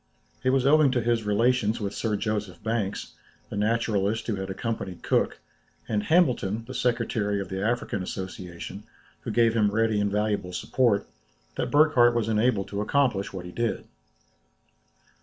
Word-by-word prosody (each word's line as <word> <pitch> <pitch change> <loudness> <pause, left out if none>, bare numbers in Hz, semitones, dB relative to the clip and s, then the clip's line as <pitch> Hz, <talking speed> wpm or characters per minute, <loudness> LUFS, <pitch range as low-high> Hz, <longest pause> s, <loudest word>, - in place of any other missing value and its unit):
It 130 - +2
was 130 0 +2
owing 150 0 +5
to 125 - +1
his 115 -1 0
relations 115 +1 +2
with 100 -2 -3
Sir 110 -2 -1
Joseph 105 -2 -3
Banks, 110 -3 -2 0.4
the - - -4
naturalist 110 0 0
who 115 - -1
had 95 0 -5
accompanied 95 -3 -4
Cook, - - +1 0.5
and 105 -2 0
Hamilton, 120 - +2
the 130 - -8
secretary 115 -5 0
of 95 -2 -5
the 95 +1 -3
African 115 -3 -1
Association, 95 0 -6 0.4
who - - -7
gave 115 -1 +3
him 105 -3 +3
ready 110 0 +1
and 100 -1 0
valuable 105 -3 -1
support, 110 +3 +1 0.5
that - - -2
Burckhardt 145 -6 +5
was 115 -2 0
enabled 110 -2 +1
to 100 0 -3
accomplish 120 -4 +1
what 95 -2 -7
he 90 - -8
did. 115 +3 -2
110 Hz, 160 wpm, -26 LUFS, 100-120 Hz, 0.5 s, owing